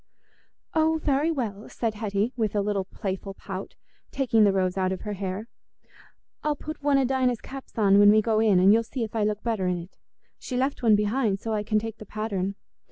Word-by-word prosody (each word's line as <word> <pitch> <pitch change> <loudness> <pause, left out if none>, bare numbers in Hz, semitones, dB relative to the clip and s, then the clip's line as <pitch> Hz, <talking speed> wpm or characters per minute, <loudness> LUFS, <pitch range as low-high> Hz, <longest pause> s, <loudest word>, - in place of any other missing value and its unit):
"Oh, 320 0 +2
very 285 +2 +2
well," 225 -9 -3
said 225 -2 -2
Hetty, 210 +2 -1
with 220 -4 -1
a 205 - +2
little 200 -1 -1
playful 195 0 -5
pout, 195 -1 -7 0.3
taking 230 -5 +2
the 205 - +5
rose 185 -1 0
out 190 -1 0
of 190 - -4
her 210 - -4
hair. 195 +2 -4 1.0
"I'll 300 -1 +1
put 310 +2 -8
one 285 -1 +3
o' 270 - +3
Dinah's 255 -2 +1
caps 270 +1 -10
on 200 -2 +5
when 205 0 +8
we 215 - +5
go 215 0 +1
in, 210 -4 +4
and 190 +3 +6
you'll 225 - +4
see 230 +2 -4
if 220 0 -6
I 220 - +1
look 210 0 -1
better 220 -6 -1
in 180 -1 0
it. 175 +2 -10 0.4
She 250 - -4
left 265 +2 0
one 225 -3 +5
behind, 210 -1 +1
so 225 +1 -3
I 210 - 0
can 215 +1 0
take 225 +1 -3
the 215 - -10
pattern." 200 -3 -3
215 Hz, 220 wpm, -26 LUFS, 200-245 Hz, 1.0 s, when